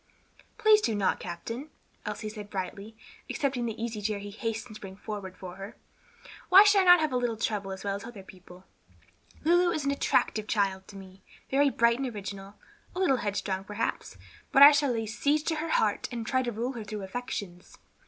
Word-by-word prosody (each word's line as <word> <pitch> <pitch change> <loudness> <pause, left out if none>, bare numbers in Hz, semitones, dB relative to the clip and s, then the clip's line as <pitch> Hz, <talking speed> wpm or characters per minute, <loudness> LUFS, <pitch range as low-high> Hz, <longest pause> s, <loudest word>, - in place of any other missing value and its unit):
"Please 430 0 +5
do 225 - 0
not, 200 -2 +1
captain," 230 - -6 0.4
Elsie 215 - -4
said 210 -1 -9
brightly, 200 +3 -6 0.3
accepting 260 -4 -1
the 225 0 -5
easy 225 -2 -4
chair 210 0 -1
he 205 0 -8
hastened 225 0 -4
to 215 - -11
bring 190 -1 -9
forward 200 -3 -7
for 185 -1 -9
her. 195 +3 -8 0.7
"Why 380 +2 +10
should 410 -1 +5
I - - +1
not 355 -1 +8
have 310 -2 0
a 250 - +1
little 240 -2 -1
trouble 205 -3 -2
as 190 0 -7
well 200 -1 -1
as 200 - -11
other 225 -4 -10
people? 185 -1 -15 0.8
Lulu 350 +3 +4
is 310 -4 -2
an 280 - +2
attractive 215 -5 0
child 195 -3 0
to 200 - -13
me, 190 0 -12 0.3
very 280 +1 +4
bright 235 -1 +2
and 270 - -1
original, 200 -3 -7 0.4
a - - -3
little 335 -9 +3
headstrong, 200 -3 -2
perhaps, 205 +1 -4 0.3
but 275 - +7
I 285 - +12
shall 285 -2 +2
lay 225 -2 -2
siege 285 +7 0
to 320 0 -1
her 320 +2 -3
heart - - +1
and 235 -2 -4
try 260 +2 +1
to 245 -2 -2
rule 235 +4 -3
her 230 -3 -6
through 210 0 -6
her - - -5
affections." 190 -4 -6
220 Hz, 205 wpm, -28 LUFS, 200-270 Hz, 0.8 s, I